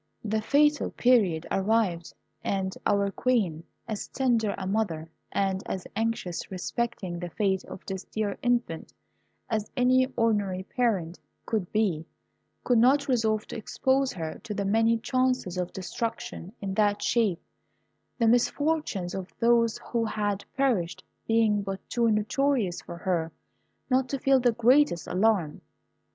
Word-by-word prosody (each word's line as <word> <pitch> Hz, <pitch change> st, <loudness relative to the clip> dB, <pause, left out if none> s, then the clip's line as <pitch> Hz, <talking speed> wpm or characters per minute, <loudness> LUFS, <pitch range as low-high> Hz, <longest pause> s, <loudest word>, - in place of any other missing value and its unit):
The 220 Hz, 0 st, 0 dB
fatal 295 Hz, +5 st, +3 dB
period 200 Hz, -10 st, +3 dB
arrived, 195 Hz, -4 st, +1 dB, 0.3 s
and 190 Hz, -1 st, -1 dB
our 200 Hz, -1 st, +2 dB
Queen, 195 Hz, -11 st, 0 dB, 0.2 s
as 215 Hz, -2 st, -4 dB
tender 235 Hz, -6 st, +1 dB
a 190 Hz, -, -4 dB
mother, 185 Hz, -6 st, -1 dB, 0.2 s
and 195 Hz, -1 st, 0 dB
as 185 Hz, -, -4 dB
anxious 225 Hz, -6 st, -2 dB
respecting 190 Hz, -1 st, -3 dB
the 175 Hz, 0 st, -5 dB
fate 190 Hz, +1 st, 0 dB
of -, -, -10 dB
this 190 Hz, -1 st, -5 dB
dear 210 Hz, -2 st, -2 dB
infant 240 Hz, -9 st, -1 dB, 0.5 s
as 215 Hz, -2 st, -2 dB
any 255 Hz, +1 st, +4 dB
ordinary 205 Hz, -5 st, +1 dB
parent 190 Hz, -7 st, -1 dB, 0.3 s
could 210 Hz, -6 st, -2 dB
be, 190 Hz, -8 st, 0 dB, 0.6 s
could 245 Hz, -2 st, +3 dB
not 280 Hz, +5 st, +4 dB
resolve 220 Hz, -4 st, +1 dB
to -, -, -6 dB
expose 265 Hz, +4 st, +1 dB
her 160 Hz, -3 st, -5 dB
to 215 Hz, -3 st, -5 dB
the 200 Hz, -1 st, -1 dB
many 225 Hz, +3 st, +3 dB
chances 255 Hz, -6 st, 0 dB
of 180 Hz, -1 st, -2 dB
destruction 190 Hz, -1 st, -5 dB
in 195 Hz, -1 st, -3 dB
that 205 Hz, 0 st, +2 dB
shape, 215 Hz, -8 st, +2 dB, 0.8 s
the 230 Hz, -, +2 dB
misfortunes 245 Hz, -, +1 dB
of 190 Hz, -1 st, -5 dB
those 230 Hz, -1 st, +3 dB
who 235 Hz, -1 st, +1 dB
had 205 Hz, -2 st, -1 dB
perished 230 Hz, -11 st, 0 dB, 0.2 s
being 225 Hz, -2 st, +3 dB
but 195 Hz, -1 st, -4 dB
too 235 Hz, -1 st, +2 dB
notorious 215 Hz, -2 st, +1 dB
for 170 Hz, -, -9 dB
her 170 Hz, -3 st, -1 dB, 0.6 s
not 255 Hz, 0 st, +2 dB
to 275 Hz, -, -1 dB
feel 270 Hz, 0 st, +4 dB
the 245 Hz, -1 st, +3 dB
greatest 235 Hz, -, +3 dB
alarm. 185 Hz, -5 st, +1 dB
215 Hz, 140 wpm, -27 LUFS, 190-240 Hz, 0.8 s, any